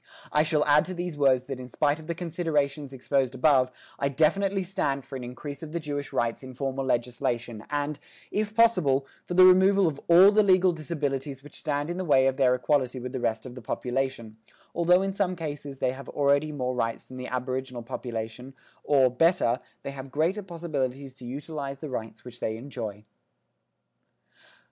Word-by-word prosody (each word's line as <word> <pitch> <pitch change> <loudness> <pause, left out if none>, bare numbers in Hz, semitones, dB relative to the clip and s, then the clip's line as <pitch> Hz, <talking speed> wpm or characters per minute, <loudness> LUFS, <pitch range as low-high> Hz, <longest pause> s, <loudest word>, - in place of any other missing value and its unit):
I 150 - +4
shall 155 -1 +2
add 150 +1 +5
to 185 +2 -5
these 175 -2 -4
words 135 -3 +3
that 130 0 -6
in 125 -1 -8
spite 145 +3 +1
of 160 - -12
the 170 - -2
considerations 155 -5 -1
exposed 135 0 0
above, 130 -2 +4 0.3
I 140 - +1
definitely 190 +7 +2
stand 140 -7 -2
for 135 - -8
an 130 - -5
increase 130 +3 -7
of 160 -1 -8
the 170 - -1
Jewish 145 -2 -4
rights 115 -1 -1
in 130 -1 -10
formal 135 +1 -2
legislation 120 -2 -1
and, 145 0 -2 0.3
if 210 0 -1
possible, 180 -13 +4 0.2
for 175 - -3
the 185 0 +9
removal 190 +1 +6
of 145 -3 -3
all 180 +4 +8
the 215 +1 +5
legal 185 -2 +5
disabilities 140 -4 -3
which 145 - -11
stand 145 -1 -1
in 175 - -4
the 185 - -2
way 135 -6 +4
of 135 0 +1
their 130 -2 +4
equality 130 -1 0
with 125 +1 -6
the 130 - -2
rest 110 -1 -1
of 125 - -8
the 125 - -9
population 125 -1 -3 0.4
(although 180 +2 +4
in 195 0 -2
some 190 -2 0
cases 145 -4 -6
they 125 - +1
have 130 0 -9
already 140 +1 +2
more 130 -3 -2
rights 115 -2 -2
than 130 - -11
the 125 0 -5
aboriginal 130 -1 -3
population, 120 +1 -6 0.3
or, 135 -3 +4
better, 125 -3 +3 0.2
they 140 - -4
have 135 0 -8
greater 165 +9 0
possibilities 140 -7 -4
to 125 - -10
utilise 140 +1 -5
the 150 0 -7
rights 110 -2 -6
which 120 -1 -10
they 110 0 -2
enjoy)." 115 -5 -6
140 Hz, 190 wpm, -27 LUFS, 130-160 Hz, 0.4 s, the